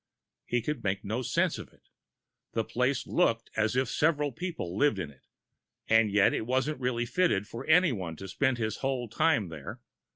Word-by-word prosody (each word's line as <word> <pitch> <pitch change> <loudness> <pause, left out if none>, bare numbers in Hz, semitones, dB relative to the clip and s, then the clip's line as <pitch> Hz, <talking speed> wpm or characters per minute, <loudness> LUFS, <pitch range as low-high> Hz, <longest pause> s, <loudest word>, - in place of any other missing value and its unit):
He 120 -2 0
could 150 -2 -3
make 95 0 -1
no 110 +5 -2
sense 125 - 0
of - - -10
it - - -28 0.6
the 115 - +1
place 125 +5 0
looked 115 -10 +1
as 110 +2 +1
if 130 0 +2
several 150 +1 +1
people 165 - -5
lived 145 -1 +3
in 85 -6 -4
it, 65 - -24 0.6
and 110 -1 +4
yet 100 0 +4
it 110 - -2
wasn't 130 +3 0
really 120 -1 0
fitted 120 - +1
for 115 - -8
anyone 130 - +3
to 95 +5 -8
spend 130 +3 +1
his 110 -2 -2
whole 130 -3 -2
time 115 - +1
there. 75 -4 -8
120 Hz, 185 wpm, -29 LUFS, 105-140 Hz, 0.6 s, and